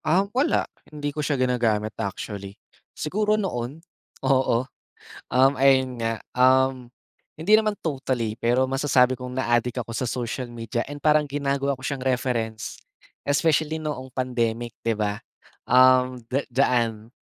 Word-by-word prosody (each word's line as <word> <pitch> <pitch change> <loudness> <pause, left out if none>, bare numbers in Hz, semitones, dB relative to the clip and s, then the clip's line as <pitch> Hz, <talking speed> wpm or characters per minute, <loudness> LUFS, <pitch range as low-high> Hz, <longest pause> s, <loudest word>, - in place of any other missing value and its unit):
Ah, 185 +5 +3
wala. 270 +6 +2 0.2
Hindi 145 -1 -4
ko 150 - -3
siya 145 -1 0
ginagamit, 115 -4 +1
actually. 100 0 -5 0.4
Siguro 210 +6 0
noon, 155 - -4 0.4
oo, 130 -2 +2 0.7
um, 135 +2 +5
ayun 130 -1 +3
nga, 115 -1 -1 0.2
um, 130 -1 +3 0.5
hindi 180 +7 +2
naman 215 -1 +1
totally 130 -7 -2
pero 120 +2 +2
masasabi 130 -2 +3
kong 125 0 -7
naadik 120 0 +1
ako 115 - -7
sa 130 - -1
social 125 +1 -3
media 120 0 -3
and 145 - -6
parang 150 +1 +4
ginagawa 140 -1 -1
ko - - -13
siyang 135 -2 -3
reference, 120 -4 -1 0.5
especially 155 +2 +1
noong 145 -4 -5
pandemic, 120 -2 -2
di 115 - +1
ba. 105 -1 -1 0.4
Um, 130 0 +5
da 135 +3 -1
diyaan, 115 -4 +1
130 Hz, 135 wpm, -24 LUFS, 120-140 Hz, 0.7 s, um